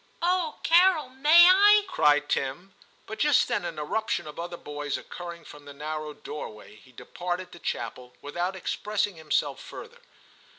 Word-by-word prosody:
* - - -36
Oh, 355 -3 0
Carol, 340 -4 +4
may 300 +7 +6
I? 410 +3 +6
' - - -19
cried 150 - +2
Tim; 160 +9 -3 0.3
but 220 - -8
just 295 -4 +3
then 235 -7 -1
an 165 -2 -5
eruption 175 +3 -2
of 150 +1 -9
other 175 0 -5
boys 145 -2 -5
occurring 170 -2 -9
from 145 -1 -13
the 145 - -10
narrow 155 +1 -5
doorway, 110 -8 -9
he 130 +4 -20
departed 180 +8 -5
to 175 - -12
chapel 125 -5 -5
without 175 +6 -3
expressing 205 +1 -2
himself 160 -2 -1
further. 485 +1 -11
175 Hz, 165 wpm, -26 LUFS, -, 0.3 s, may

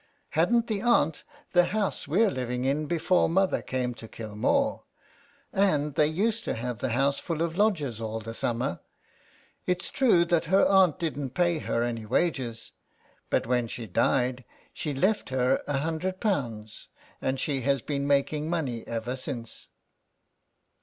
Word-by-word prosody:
" - - -42
Hadn't 230 +9 +2
her 215 -2 -2
aunt 200 -10 +2 0.3
the 175 -1 +5
house 205 -3 -1
we're 195 +8 +3
living 125 -2 -2
in 145 +3 0
before 175 +3 +2
mother 190 +3 +2
came 125 -1 -2
to 115 -1 -11
Kilmore, 115 - -1 0.7
and 150 -7 +2
they 150 +1 +3
used 210 +8 0
to - - -1
have 120 -1 -4
the 130 - -1
house 140 +3 +2
full 165 -2 -2
of 165 -1 -2
lodgers 160 - +1
all 110 0 -3
the 115 +1 -7
summer. 120 -4 -2 0.9
It's 180 -1 -1
true 225 -11 +4
that 170 -1 +1
her 190 +5 +4
aunt 190 -4 +5
didn't 145 -6 -3
pay 175 -2 +2
her 115 -5 -1
any 115 -2 -3
wages, 125 -4 -1 0.6
but - - +1
when 125 0 +1
she 115 0 -6
died 125 +5 +1 0.3
she 150 - -3
left 190 +7 +1
her 130 0 +2
a 145 -1 0
hundred 165 +5 -2
pounds, 115 - -2 0.3
and 130 0 -1
she 140 -3 -1
has 140 0 +1
been 140 -1 -2
making 150 +2 +1
money 135 -9 -2
ever 115 +2 -3
since." 120 -3 -6
145 Hz, 160 wpm, -27 LUFS, 125-175 Hz, 0.9 s, the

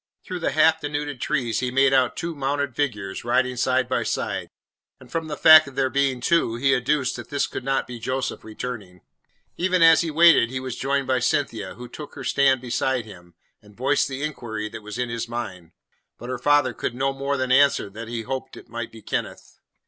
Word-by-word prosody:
Through 180 - -5
the 165 - -1
half 160 +1 +4
denuded 145 -2 -4
trees 125 -6 -1
he 125 - -1
made 135 +2 +3
out 130 -2 +3
two 170 0 -4
mounted 140 -2 -2
figures, 105 -10 -3
riding 125 +1 +1
side 130 +1 +1
by - - 0
side; - - -3 0.5
and - - -16
from 165 -1 -2
the 150 - -5
fact 155 -1 +8
of 140 - -11
there 135 -1 +1
being 135 -2 +1
two, 165 -5 +2
he 135 +3 +2
adduced 130 +1 0
that - - -9
this 140 -1 0
could - - -6
not 135 +1 0
be 125 -1 -8
Joseph 130 +3 -3
returning. 105 -5 -7 0.6
Even 180 -1 +2
as 165 -1 +7
he 170 - -2
waited 165 -6 +5
he 130 +1 -4
was 130 -2 -5
joined 140 +1 -1
by 130 -1 +1
Cynthia, 115 -6 -1
who 125 0 -9
took 150 +5 -10
her - - -7
stand 135 -2 +3
beside 125 0 -1
him, 90 -5 -14 0.3
and 105 -1 -19
voiced 135 +4 +1
the 135 +1 -5
inquiry 115 -8 -4
that 115 +1 -9
was 105 +1 -8
in 125 -1 -2
his 120 0 -4
mind. 95 -8 -6 0.5
But 120 - -9
her 130 - -3
father 145 -4 +3
could 120 - -4
no 135 +2 0
more 140 +1 -2
than 130 -1 -1
answer 140 -4 +4
that 110 +2 -8
he 115 -1 -4
hoped 130 +3 -5
it - - -13
might 115 0 -5
be 110 -1 -13
Kenneth. - - -5
130 Hz, 215 wpm, -23 LUFS, 120-140 Hz, 0.6 s, fact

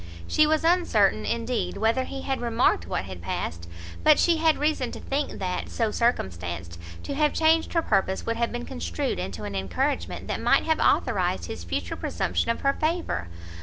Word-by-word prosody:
She 305 - +4
was 310 0 +2
uncertain, 280 - +3
indeed, 235 +1 -1
whether 230 +4 +1
he 270 +1 -6
had 270 -2 -2
remarked 230 - +2
what 95 - -2
had 90 -2 -8
passed, 85 0 -4 0.3
but 305 -1 +7
she 340 -2 +3
had 320 0 +3
reason 295 -5 0
to - - -6
think 280 +2 -2
that, 180 -1 -3
so 225 -2 0
circumstanced, 85 - -2 0.2
to - - -4
have 300 +1 +2
changed 320 0 +3
her 330 -1 +2
purpose, 190 -2 0
would 230 - -1
have 235 0 0
been 240 0 -4
construed 85 +1 -3
into 95 +3 -5
an 100 -1 -5
encouragement 95 -3 -2
that - - -2
might - - +4
have - - +1
authorised 90 -3 +2
his 85 - -6
future 85 0 -3
presumption - - -1
of 230 - 0
her 275 0 +3
favour. 310 - -1
230 Hz, 185 wpm, -26 LUFS, -, 0.3 s, but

